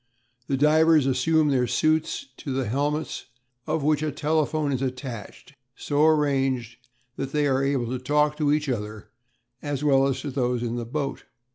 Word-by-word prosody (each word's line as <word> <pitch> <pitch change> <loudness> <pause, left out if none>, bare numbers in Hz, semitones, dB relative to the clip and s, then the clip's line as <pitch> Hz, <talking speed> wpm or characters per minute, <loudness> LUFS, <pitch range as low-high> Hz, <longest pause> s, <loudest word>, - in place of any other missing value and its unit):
The 135 - 0
divers 155 +1 +4
assume 150 +4 +2
their 125 -3 +2
suits, 155 - 0
to 140 - -6
the 130 0 -1
helmets 145 +6 -2 0.4
of 155 -1 -1
which 150 0 +2
a 155 -1 -1
telephone 150 0 0
is 130 -1 -1
attached, 130 -1 -6 0.2
so 145 0 0
arranged 135 -6 +1 0.4
that 135 0 -4
they 150 -1 +2
are 135 -1 +1
able 135 -3 0
to 130 - -2
talk 150 +3 +1
to 150 -2 +1
each 150 0 +1
other 105 -4 -4 0.5
as 145 -1 -3
well 135 -2 +4
as 135 - -2
to 145 - -5
those 125 -2 -1
in 120 0 -2
the 120 -1 -4
boat. 140 +2 -4
140 Hz, 170 wpm, -25 LUFS, 130-150 Hz, 0.5 s, divers